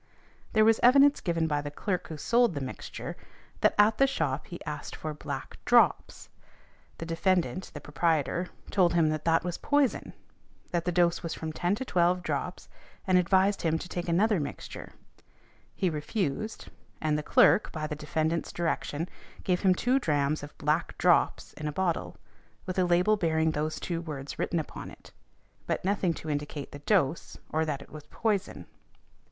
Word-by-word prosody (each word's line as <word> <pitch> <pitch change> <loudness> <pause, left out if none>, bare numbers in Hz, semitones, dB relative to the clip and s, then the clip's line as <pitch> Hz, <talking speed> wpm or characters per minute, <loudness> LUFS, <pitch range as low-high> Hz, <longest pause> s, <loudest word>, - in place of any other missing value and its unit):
There 215 -1 +5
was 225 0 +4
evidence 275 +3 +6
given 165 -2 0
by 145 -2 0
the 145 - -5
clerk 180 +5 -3
who 160 - -7
sold 235 +3 +2
the - - -1
mixture, 130 -2 -6 0.4
that - - +3
at 210 +1 +4
the 275 - +6
shop 150 - -2
he 175 - -8
asked 150 -1 -5
for 155 -1 -5
"black 150 - -7
drops," - - +3 0.7
the 165 - -6
defendant, 180 +2 0
the 145 - -6
proprietor, 165 +3 0 0.2
told 180 -4 +3
him 165 -2 +4
that 155 -1 -3
that 165 0 +3
was 175 -1 -4
poison, 285 -3 +1 0.6
that 170 -1 -1
the 180 - +1
dose 175 0 +2
was 165 -1 -4
from 160 -1 -5
ten 175 +4 0
to 260 - -5
twelve 180 -3 +2
drops, - - -3 0.4
and 185 -2 +4
advised 190 +3 +3
him 160 -1 +1
to 170 - -7
take 175 -1 -4
another 200 +3 +3
mixture; 145 -1 -7 0.8
he 190 - 0
refused, 175 +4 -3 0.3
and 155 -1 0
the 150 - 0
clerk 205 - +4
(by 155 -2 -4
the 150 0 -4
defendant's 155 +2 -1
direction), 165 -1 -2 0.4
gave 180 -1 +1
him 185 -2 +4
two 250 +7 +2
drachms 150 - 0
of 145 +1 -10
"black 150 +3 0
drops" 180 -1 +2
in 150 - -5
a - - -1
bottle, 175 +2 -2 0.5
with 185 0 -2
a 185 - +4
label 180 +5 +3
bearing 160 -3 +1
those 155 +1 -2
two 170 -2 -3
words 145 -4 -7
written 175 - 0
upon 155 - -5
it, - - -15 0.6
but - - -2
nothing 190 -2 +1
to 160 - -7
indicate 145 -1 -4
the 145 - -9
dose, 165 -2 0 0.2
or 160 +1 +2
that 140 -3 -3
it - - -21
was 150 -1 -10
poison. 210 -3 -2
170 Hz, 175 wpm, -28 LUFS, 155-185 Hz, 0.8 s, evidence